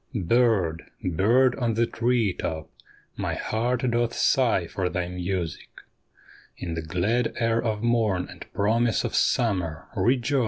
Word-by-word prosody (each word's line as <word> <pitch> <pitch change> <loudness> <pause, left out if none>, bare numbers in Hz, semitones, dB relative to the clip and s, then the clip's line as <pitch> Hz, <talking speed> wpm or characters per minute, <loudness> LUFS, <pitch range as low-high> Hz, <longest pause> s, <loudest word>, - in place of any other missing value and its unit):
Bird, 95 -5 +1
bird 115 +9 +3
on 115 -3 0
the 115 +1 +3
tree 115 -4 +1
top, 80 -2 -5 0.5
my - - -2
heart 120 +2 -1
doth 120 0 0
sigh 120 -9 +2
for 90 +2 -2
thy 90 0 -2
music; 90 -2 -4 0.9
In 85 -2 -5
the 80 - -3
glad 95 +10 0
air 115 -1 +1
of 110 -2 -2
morn 110 -6 +1
and - - -10
promise 110 +2 +1
of - - -3
summer, 90 -9 0
rejoice 130 +2 +2
110 Hz, 135 wpm, -25 LUFS, 90-120 Hz, 0.9 s, bird